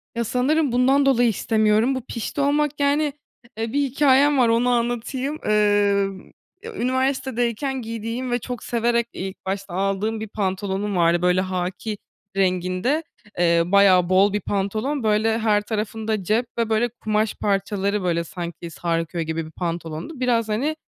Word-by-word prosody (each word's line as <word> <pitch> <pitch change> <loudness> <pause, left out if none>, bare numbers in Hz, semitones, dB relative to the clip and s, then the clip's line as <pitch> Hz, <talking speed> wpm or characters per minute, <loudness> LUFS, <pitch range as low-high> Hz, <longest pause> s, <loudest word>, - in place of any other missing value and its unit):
Ya, 235 - 0
sanırım 265 +5 +1
bundan 265 +3 +3
dolayı 245 -3 +4
istemiyorum. 220 +3 +2
Bu 260 - -3
pişti 250 +3 -4
olmak, 295 +1 +1
yani, 285 +1 +2 0.4
eee, 225 +1 -3
bir 285 - +2
hikâyem 280 +1 +3
var, 245 -3 +4
onu 235 +2 +2
anlatayım. 245 +4 -1
Emm, 205 -2 +1 0.3
ya, 455 -1 -8
üniversitedeyken 260 - -1
giydiğim 230 +2 -4
ve 245 - +1
çok 245 0 -6
severek, 235 0 +1
iii, 190 - -4
ilk 190 - -16
başta 195 -1 -4
aldığım 195 +3 -1
bir 220 - -5
pantolonum 200 0 -2
vardı. 170 0 +3
Böyle, 180 +1 +3
hâkî 185 +3 -3 0.4
renginde, 185 - +1 0.4
eee, 170 -1 +4
bayağı 185 -1 +5
bol 195 +2 +4
bir 210 - -1
pantolon, 215 +9 -2
böyle, 220 +1 +2
her 215 -2 +2
tarafında 215 -1 -3
cep 220 +6 +1
ve, 230 -1 0
böyle, 225 +2 +2
kumaş 215 -2 -1
parçaları, 200 0 -1
böyle, 170 -2 0
sanki 170 0 -7
sarkıyor 165 0 -2
gibi 160 0 -3
bir 160 - -11
pantolondu 170 - -5
biraz, 235 -3 +1
hani, 270 +9 0
220 Hz, 150 wpm, -22 LUFS, 190-250 Hz, 0.4 s, bayağı